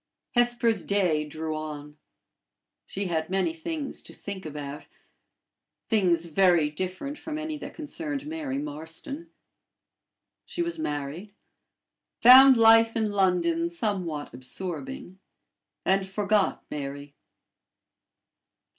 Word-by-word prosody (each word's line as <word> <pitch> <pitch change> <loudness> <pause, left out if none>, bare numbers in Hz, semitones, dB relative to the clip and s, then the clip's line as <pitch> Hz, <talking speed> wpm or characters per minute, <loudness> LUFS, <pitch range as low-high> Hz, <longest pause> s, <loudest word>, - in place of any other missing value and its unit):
Hesper's 240 -2 +2
day 180 -7 +1
drew 155 +1 -4
on. 150 -1 -6 0.9
She 200 +1 -4
had 160 -3 -1
many 195 - 0
things 320 -4 -5
to - - -12
think 190 -4 -7
about 145 -1 -7 1.0
things 180 -6 +2
very 170 -2 +3
different 185 - -5
from 310 -1 -5
any 310 0 -4
that 285 0 -8
concerned 295 -2 -4
Mary 300 -3 -4
Marston. 275 - -6 1.1
She 345 - -3
was 340 -1 -4
married; 150 - -4 0.8
found 260 +2 +9
life 225 0 +6
in 220 -2 0
London 175 -4 +2
somewhat 170 - -3
absorbing; 185 - -6 0.7
and 190 0 +2
forgot 205 0 +1
Mary. 140 0 -6
195 Hz, 100 wpm, -27 LUFS, 160-265 Hz, 1.1 s, found